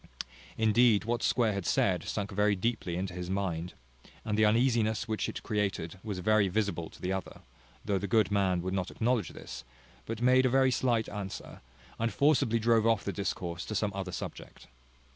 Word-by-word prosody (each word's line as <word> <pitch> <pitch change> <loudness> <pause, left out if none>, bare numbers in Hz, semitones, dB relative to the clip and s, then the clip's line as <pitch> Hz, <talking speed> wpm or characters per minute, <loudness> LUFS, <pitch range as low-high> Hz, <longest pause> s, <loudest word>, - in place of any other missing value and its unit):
Indeed 110 -1 +4
what 120 +1 -1
Square 115 -4 +2
had 100 -3 -4
said 90 -4 +2
sunk 100 -2 -3
very 105 +1 +2
deeply 100 -3 -2
into 90 0 -3
his 90 0 -5
mind, 90 -3 -2 0.5
and 105 - -1
the 110 0 +4
uneasiness 110 -1 +2
which 110 -1 -1
it - - -7
there - - -5
created 100 -4 -2
was 105 -4 -4
very 110 +2 +3
visible 100 -4 -1
to - - -16
the 95 +1 -2
other; 95 -1 -6 0.4
though 100 -2 +1
the 100 - -3
good 110 -3 +3
man 95 -3 +1
would 95 +1 -2
not 95 -1 -1
acknowledge 120 -1 0
this, - - -9 0.4
but 115 -1 -4
made 130 +1 +4
a - - +2
very 130 +1 +4
slight 120 -3 +1
answer, 100 -2 -7 0.4
and 115 0 0
forcibly 135 -6 +3
drove 115 0 +3
off 115 -3 +2
the 100 - -3
discourse 90 -3 -3
to 110 - -5
some 105 0 0
other 95 -1 -4
subject. 90 - -8
105 Hz, 190 wpm, -30 LUFS, 95-115 Hz, 0.5 s, Indeed